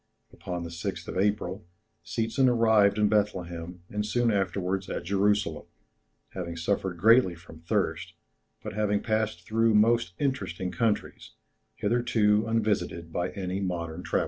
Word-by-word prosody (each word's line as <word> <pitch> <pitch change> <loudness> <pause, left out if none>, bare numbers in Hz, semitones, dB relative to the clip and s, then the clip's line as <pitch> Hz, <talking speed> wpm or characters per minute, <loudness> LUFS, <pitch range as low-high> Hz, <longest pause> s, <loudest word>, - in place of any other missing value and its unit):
Upon 90 -1 -5
the 85 - -7
6th 85 - -5
of - - -5
April, 100 -1 0 0.4
Seetzen 115 +4 +1
arrived 110 -4 +4
in 105 0 +4
Bethlehem, 90 -5 -1
and 105 +2 -3
soon 120 +2 +1
afterwards 95 -1 -1
at - - -3
Jerusalem, 100 +2 0 0.6
having 85 -2 -5
suffered 90 +1 -1
greatly 110 0 +5
from 80 -1 -14
thirst, 85 -2 -1 0.5
but - - -5
having 105 -1 0
passed 110 -5 -1
through 115 0 +2
most 115 -2 +3
interesting 95 - -2
countries, 105 +4 -2 0.4
hitherto 110 -1 +2
unvisited 100 -7 -1
by 90 +1 -1
any 95 -1 -3
modern 85 -3 -3
traveller. - - 0
100 Hz, 135 wpm, -28 LUFS, 90-110 Hz, 0.6 s, greatly